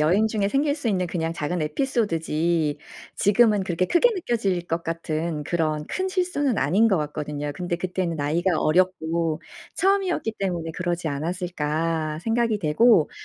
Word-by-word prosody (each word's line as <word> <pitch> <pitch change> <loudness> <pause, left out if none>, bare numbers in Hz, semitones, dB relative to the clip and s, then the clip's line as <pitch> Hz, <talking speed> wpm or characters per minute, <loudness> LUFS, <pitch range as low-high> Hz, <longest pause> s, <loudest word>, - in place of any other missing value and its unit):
여행 180 +8 +3
중에 210 -2 0
생길 285 +4 +1
수 285 -6 -3
있는 185 -4 +1
그냥 165 -1 -2
작은 170 +2 -2
에피소드지 165 - 0 0.4
지금은 210 0 +4
그렇게 185 0 0
크게 350 - +4
느껴질 210 - -1
것 165 +1 -2
같은 160 -2 -3
그런 155 -3 -1
큰 375 0 -2
실수는 355 - 0
아닌 195 +11 +3
것 195 - +3
같거든요. 150 -1 -4
근데 175 -1 -2
'그때는 180 -2 -2
나이가 160 +4 0
어렸고 165 -1 +1 0.3
처음이었기 380 - +1
때문에 175 -4 -2
그러지 175 -2 -2
않았을까?' 160 0 -2
생각이 225 0 +1
되고 170 +2 +4
175 Hz, 345 characters per minute, -24 LUFS, 160-215 Hz, 0.4 s, 지금은